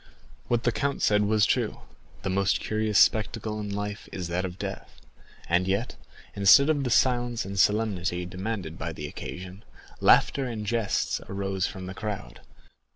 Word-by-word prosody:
What 120 Hz, -1 st, +1 dB
the 120 Hz, -, +2 dB
count 140 Hz, +4 st, -2 dB
said 105 Hz, 0 st, +3 dB
was 105 Hz, 0 st, +3 dB
true—the -, -, -4 dB
most 95 Hz, 0 st, +2 dB
curious 110 Hz, -1 st, 0 dB
spectacle 110 Hz, 0 st, +2 dB
in 105 Hz, -1 st, -4 dB
life 105 Hz, +1 st, -5 dB
is 90 Hz, -3 st, -5 dB
that 90 Hz, +2 st, -1 dB
of 90 Hz, -1 st, -6 dB
death. -, -, -7 dB, 0.5 s
And 90 Hz, +2 st, +2 dB
yet, 100 Hz, +5 st, -1 dB, 0.4 s
instead 140 Hz, +9 st, +6 dB
of 145 Hz, -3 st, 0 dB
the 125 Hz, -, -1 dB
silence 120 Hz, -2 st, +2 dB
and 100 Hz, -, -6 dB
the 100 Hz, -, -3 dB
solemnity 95 Hz, -4 st, +1 dB
demanded 95 Hz, -2 st, -5 dB
by 85 Hz, 0 st, -4 dB
the 75 Hz, -, -6 dB
occasion, 90 Hz, +6 st, -8 dB, 0.4 s
laughter 135 Hz, -, +4 dB
and 110 Hz, -3 st, -5 dB
jests 115 Hz, -2 st, 0 dB
arose 95 Hz, -1 st, -1 dB
from 95 Hz, -1 st, -7 dB
the 95 Hz, -, -6 dB
crowd. 105 Hz, 0 st, -6 dB
100 Hz, 160 wpm, -27 LUFS, 95-115 Hz, 0.5 s, instead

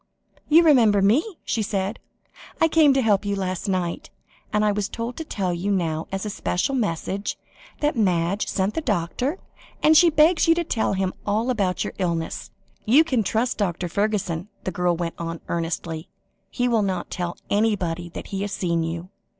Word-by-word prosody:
"You 325 Hz, +3 st, +7 dB
remember 235 Hz, -10 st, +5 dB
me?" 305 Hz, -, +2 dB
she 225 Hz, -, -1 dB
said. 200 Hz, 0 st, -2 dB, 0.6 s
"I 325 Hz, -, +5 dB
came 315 Hz, -2 st, +5 dB
to 265 Hz, -, +2 dB
help 210 Hz, -3 st, +3 dB
you 200 Hz, 0 st, -1 dB
last 185 Hz, 0 st, -3 dB
night; 185 Hz, -, -2 dB, 0.4 s
and 210 Hz, 0 st, +2 dB
I 210 Hz, -, +3 dB
was 205 Hz, -1 st, -2 dB
told 235 Hz, +1 st, -4 dB
to 320 Hz, -, -3 dB
tell 190 Hz, -, -2 dB
you 175 Hz, +4 st, -2 dB
now 165 Hz, -5 st, -1 dB
as 195 Hz, +2 st, -3 dB
a -, -, -2 dB
special 200 Hz, +8 st, -1 dB
message, 200 Hz, -3 st, -2 dB, 0.4 s
that 295 Hz, 0 st, +1 dB
Madge 185 Hz, -2 st, +1 dB
sent 195 Hz, +2 st, 0 dB
the 320 Hz, -, -2 dB
doctor, 235 Hz, -, -1 dB, 0.5 s
that 310 Hz, +1 st, +6 dB
she 345 Hz, +2 st, +7 dB
begs 320 Hz, +2 st, +4 dB
you 330 Hz, -, +6 dB
to 340 Hz, -, 0 dB
tell 225 Hz, -11 st, 0 dB
him 190 Hz, -1 st, -1 dB
all 220 Hz, +5 st, 0 dB
about 195 Hz, -6 st, 0 dB
your -, -, -5 dB
illness. 170 Hz, -3 st, -2 dB, 0.3 s
You 270 Hz, +9 st, +6 dB
can 260 Hz, -8 st, +1 dB
trust 225 Hz, +4 st, -1 dB
Dr. 180 Hz, -3 st, -1 dB
Fergusson," 195 Hz, -2 st, -1 dB, 0.2 s
the 185 Hz, -, -2 dB
girl 180 Hz, 0 st, +1 dB
went 170 Hz, 0 st, -3 dB
on 165 Hz, 0 st, -4 dB
earnestly. 165 Hz, -1 st, -3 dB, 0.4 s
"He 245 Hz, -1 st, 0 dB
will 230 Hz, -3 st, +2 dB
not 190 Hz, -3 st, -2 dB
tell 175 Hz, -2 st, -3 dB
anybody 185 Hz, -5 st, 0 dB
that -, -, -8 dB
he 195 Hz, -, -1 dB
has 200 Hz, 0 st, -3 dB
seen 170 Hz, -4 st, 0 dB
you. 165 Hz, +2 st, -4 dB
200 Hz, 185 wpm, -24 LUFS, 175-240 Hz, 0.6 s, You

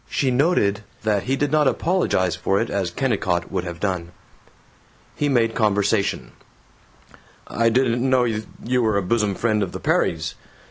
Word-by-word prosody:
She 135 Hz, -2 st, 0 dB
noted 125 Hz, -, +2 dB, 0.2 s
that 105 Hz, -3 st, 0 dB
he 130 Hz, +2 st, +1 dB
did 145 Hz, 0 st, -1 dB
not 150 Hz, -2 st, +3 dB
apologize 130 Hz, -, +1 dB
for 95 Hz, +3 st, 0 dB
it, -, -, -2 dB
as 95 Hz, -3 st, -1 dB
Kennicott 95 Hz, -5 st, -1 dB
would -, -, -2 dB
have 85 Hz, -1 st, -6 dB
done. 90 Hz, -4 st, -3 dB, 1.0 s
He 145 Hz, -, 0 dB
made 115 Hz, -4 st, +2 dB
conversation: 100 Hz, -, 0 dB, 1.1 s
"I 115 Hz, 0 st, +1 dB
didn't 125 Hz, +1 st, +1 dB
know 130 Hz, -1 st, +4 dB
you 115 Hz, +2 st, -2 dB
were 110 Hz, -3 st, +1 dB
a 100 Hz, -, 0 dB
bosom 105 Hz, 0 st, 0 dB
friend 110 Hz, -1 st, 0 dB
of 95 Hz, -3 st, -3 dB
the -, -, -5 dB
Perrys. 80 Hz, -1 st, 0 dB
110 Hz, 155 wpm, -22 LUFS, 95-125 Hz, 1.1 s, know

